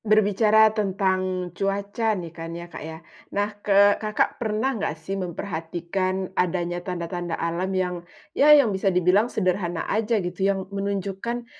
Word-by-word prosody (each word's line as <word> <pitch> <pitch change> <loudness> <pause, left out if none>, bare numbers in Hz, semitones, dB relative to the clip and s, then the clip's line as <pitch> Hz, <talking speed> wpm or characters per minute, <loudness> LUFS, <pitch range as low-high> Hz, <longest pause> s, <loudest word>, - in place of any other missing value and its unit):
Berbicara 215 +1 +4
tentang 185 -3 -1
cuaca 200 +3 -1
nih 170 -3 -7
kan 165 0 -7
ya, 170 - -7
Kak - - -7
ya. 160 +1 -7 0.4
Nah, 205 +1 0
ke 200 0 +4
Kakak 215 +2 -1
pernah 225 +4 0
enggak 200 -8 -3
sih 160 +5 -6
memperhatikan 185 +1 -3
adanya 175 -1 -1
tanda-tanda 175 -1 -4
alam 170 +3 -2
yang, 185 -1 -1 0.4
ya 290 - +4
yang 285 -8 +7
bisa 190 +1 +1
dibilang 185 +5 +3
sederhana 180 -5 -1
aja 220 +1 +1
gitu 180 -1 -4
yang 195 -1 +1
menunjukkan, 200 +4 -3
190 Hz, 145 wpm, -24 LUFS, 175-210 Hz, 0.4 s, yang